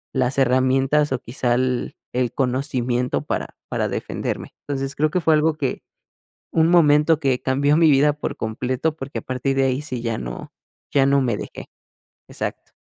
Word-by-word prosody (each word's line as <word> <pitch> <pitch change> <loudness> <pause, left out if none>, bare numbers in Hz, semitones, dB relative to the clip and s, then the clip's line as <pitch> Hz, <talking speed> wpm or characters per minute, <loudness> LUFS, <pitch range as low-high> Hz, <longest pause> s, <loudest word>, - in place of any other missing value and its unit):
las 130 +1 0
herramientas 135 +3 +3
o 130 - 0
quizá 120 0 -1
el 125 -1 -1 0.2
el 125 -2 0
conocimiento 125 -2 -1
para - - -3
para - - -1
defenderme, - - -4
entonces, 135 -1 -3
creo 155 +1 +2
que 180 - 0
fue 160 -1 +3
algo 155 +1 +2
que, 135 -4 -3 0.7
un 160 0 +3
momento 150 -2 +5
que 135 -4 0
cambió 140 +3 +2
mi 160 -2 +5
vida 145 +2 +4
por 150 - -4
completo 125 +7 -2
porque 135 0 -5
a - - -11
partir 130 +1 -2
de 135 - +3
ahí 130 +2 0
sí 130 -5 -5
ya 115 -2 -2
no - - -7 0.4
ya 135 -2 +4
no 140 0 +4
me 120 -5 0
dejé, - - -8 0.6
exacto. - - -5
135 Hz, 175 wpm, -22 LUFS, 125-150 Hz, 0.7 s, momento